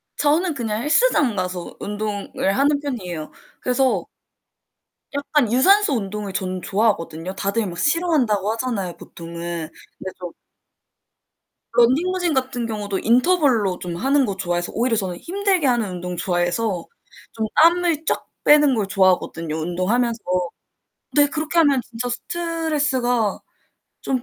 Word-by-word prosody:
저는 310 +4 +2
그냥 225 -4 -3
헬스장 300 - +3
가서 180 -2 -4
운동을 205 -1 -2
하는 285 +1 +3
편이에요. 185 - -5 0.3
그래서 255 +1 +1 1.1
약간 285 -4 +1
유산소 390 +6 +5
운동을 205 -3 -3
저는 185 -1 -3
좋아하거든요. 185 -5 -1
다들 200 +3 -1
막 175 - -7
싫어한다고 280 - +2
하잖아요, 225 -7 -3
보통은. 170 -1 -7 0.3
근데 190 - -5
전 180 -2 -6 1.4
런닝머신 330 +9 +2
같은 255 -3 -1
경우도 205 -3 -3
인터벌로 245 - +2
좀 175 -1 -5
하는 270 +7 +2
거 200 -4 -3
좋아해서 175 -2 -2
오히려 235 0 +1
저는 185 -4 -2
힘들게 380 -4 0
하는 235 -5 +1
운동 180 0 -5
좋아해서 175 +3 -1 0.5
좀 220 -1 -2
땀을 335 -1 +3
쫙 - - -1 0.2
빼는 295 -3 +6
걸 210 -4 -1
좋아하거든요, 180 -4 +1
운동하면서. 205 +9 0 0.9
네. 290 0 +6
그렇게 310 +3 -3
하면 280 -5 +4
진짜 240 +1 -5
스트레스가 295 - -1 0.6
좀 260 -2 -1
230 Hz, 305 characters per minute, -21 LUFS, 190-290 Hz, 1.4 s, 빼는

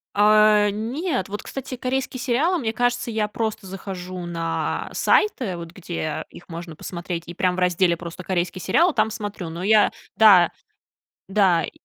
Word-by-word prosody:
А, 210 0 +5
нет. 255 - -2
Вот, 205 +1 -5
кстати, 265 -1 -6
корейские 255 +1 -2
сериалы, 280 +8 +1
мне 225 -7 -2
кажется, 245 0 0
я 215 -2 0
просто 215 -1 -3
захожу 185 -1 -6
на 165 -2 -2
сайты, 250 - +2
вот 170 -1 -8
где 170 -4 -4
их 175 - -14
можно 165 -1 -7
посмотреть, 170 0 -5
и 175 - -8
прям 180 0 +1
в - - -10
разделе 180 -1 +2
просто 170 +1 -8
"Корейские 180 0 -2
сериалы" 345 -1 +3
там 215 -1 +2
смотрю. 205 -5 -5
Но 170 +2 -6
я 215 +1 +5 0.3
Да. 195 -6 +7 0.8
Да, 190 -5 +3
и - - -4
200 Hz, 160 wpm, -23 LUFS, 175-225 Hz, 0.8 s, Да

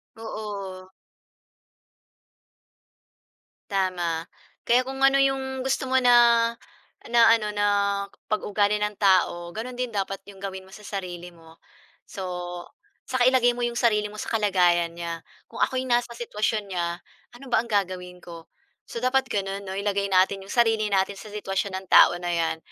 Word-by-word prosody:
Oo. 200 -4 -7 2.8
Tama. 175 -4 -1 0.4
Kaya 245 +2 +4
kung 270 0 -4
ano 275 0 +5
'yong 265 -1 0
gusto 265 0 -1
mo 260 - +5
na 235 -2 +5 0.6
na 240 - +4 0.2
ano 210 -2 -3
na 205 0 0 0.7
pag 215 - +2
ugali 205 0 +1
ng 210 0 -1
tao, 180 -3 +2
gano'n 240 +3 -6
din 250 -1 -2
dapat 195 -1 -3
'yong 200 -1 -13
gawin 190 -1 -6
mo 190 - -18
sa - - -11
sarili 180 -3 -6
mo. 165 0 -18 0.5
So, 190 - -7 0.8
saka 255 -1 +2
ilagay 255 -2 +4
mo 245 - -8
'yong 240 - -5
sarili 210 -3 +2
mo - - -12
sa - - -5
kalagayan 180 -6 +2
niya, 170 -1 -5 0.3
kung - - -9
ako'y 260 -1 +1
nasa 240 0 +1
sitwasyon 220 -2 -2
niya, 170 -1 -2 0.4
ano 270 +3 -12
ba - - +4
ang - - -11
gagawin 180 -3 -2
ko? 170 -1 -11 0.4
So 235 - -6
dapat 265 +1 +2
gano'n 195 0 -3
'no, 190 - -5
ilagay 200 0 -1
natin 190 +1 +3
'yong - - -8
sarili 225 -3 +3
natin 195 0 +1
sa - - -10
sitwasyon 195 -1 -3
ng 190 0 -9
tao - - +7
na 175 0 -3
'yan, 165 -1 0
205 Hz, 160 wpm, -25 LUFS, 185-235 Hz, 2.8 s, tao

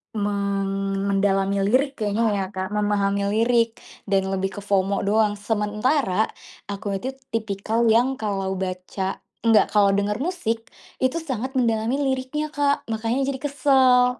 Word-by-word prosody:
men 195 -1 -1
mendalami 195 0 +1
lirik 265 +7 +2
kayaknya 215 +2 0
ya 195 -1 -1
Kak, 190 -1 -4
memahami 200 -1 +1
lirik 230 +1 +2 0.3
dan 195 -1 +2
lebih 190 +1 -2
ke - - -8
FOMO 200 0 +1
doang. 210 0 +2
Sementara 210 +1 +1 0.4
aku 200 0 -3
itu 260 +6 -4 0.2
tipikal 220 +1 -1
yang 245 +4 +3
kalau 195 -3 -2
baca 190 +1 -4 0.2
enggak 225 -2 +4
kalau 205 -1 +5
denger 205 +2 0
musik, 255 -9 -2 0.3
itu 260 +4 +2
sangat 260 -3 -4
mendalami 230 0 +1 0.2
liriknya 265 +4 -3
Kak, 285 -1 +1
makannya 230 +4 0
jadi 270 -1 -3
kesel. 260 -3 +3
215 Hz, 135 wpm, -23 LUFS, 200-250 Hz, 0.4 s, kalau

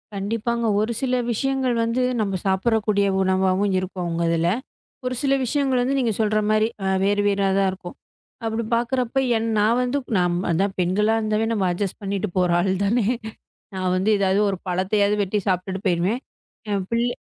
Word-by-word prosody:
கண்டிப்பாங்க. 230 +4 -2
ஒரு 220 +2 0
சில 255 -1 +1 0.2
விஷயங்கள் 265 +1 0
வந்து 230 +3 0 0.2
நம்ம 195 -3 -1
சாப்பிடுற 195 +4 +2
கூடிய 200 -1 +2
உணவாவும் 190 +1 +1
இருக்கும் 185 0 -5
அவுங்க 170 0 -1
இதுல. 165 +1 +1 0.6
ஒரு 255 - -1
சில 275 -1 +2
விஷயங்கள் 265 0 +1
வந்து 265 +3 0
நீங்கச் 230 -5 0
சொல்ற 215 0 +2
மாரி 215 0 +3 0.2
அ - - -1 0.2
வேறு 205 +1 +2
வேறா 200 -1 +2
தான் 195 -1 +3
இருக்கும். 185 -1 -9 0.5
அப்படி 225 +1 -1
பாக்குறப்போ 250 +2 0 0.2
என் 225 +1 -1
நான் 225 +3 +3
வந்து 190 - 0
பெண்களா 210 +5 +2
இருந்தாவே 215 0 0
நம்ம 200 -4 0
அட்ஜெஸ்ட் 185 +2 -3
பண்ணிட்டு 200 +1 -2
போற 180 -1 +2
ஆள் 185 +1 +1
தானே. 210 +1 +1 0.7
நான் 185 -1 -1
வந்து 190 +4 +1
ஏதாவது 195 0 +2
ஒரு 190 - -2
பழத்தையாவது 200 +3 +1
வெட்டி 200 +2 -1
சாப்பிட்டுட்டு 190 +2 -2
போயிடுவேன். 185 +7 +1 0.5
என் 200 -2 -1
பிள்ளை 235 +1 +1
205 Hz, 165 wpm, -23 LUFS, 190-230 Hz, 0.7 s, மாரி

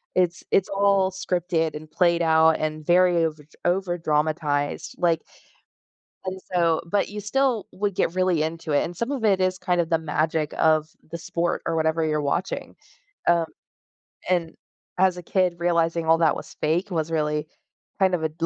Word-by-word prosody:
It's 180 -1 +1
it's 195 - +3
all 195 -1 +2
scripted 175 -4 -1
and 155 0 -9
played 170 -2 +2
out 160 0 +5
and 155 0 -3
very 180 +1 +4
overdr 150 -2 -6
overdramatized. 155 -5 0
Like 170 -2 +2 1.0
and 185 0 -4
so 170 -2 +2
but 200 +4 0
you 210 0 -6
still 245 +1 0
would 200 0 -1
get 165 - 0
really 185 -3 +2
into 160 0 -3
it, 145 - +3
and 175 - -5
some 235 +8 -3
of 260 -5 -3
it 195 -3 +3
is 185 0 +1
kind 180 -2 +1
of 165 - -4
the 165 - +3
magic 155 0 -1
of 155 -1 +3 0.2
the 170 - -4
sport 170 +1 -2
or 165 - -1
whatever 160 0 +1
you're 150 -1 0
watching, 145 +6 -2 0.5
um, 170 -1 +4 0.8
and 175 -3 0 0.4
as 185 -1 +3
a 180 - -7
kid, 180 -1 +1
realizing 170 -1 +1
all 165 +1 +4
that 160 -3 +3
was - - -9
fake 170 +6 0
was 165 -3 -2
really 150 -1 -1 0.5
kind 190 -1 +3
of 160 - -4
a 160 - +1
d 165 +2 -4
170 Hz, 175 wpm, -24 LUFS, 160-185 Hz, 1.0 s, out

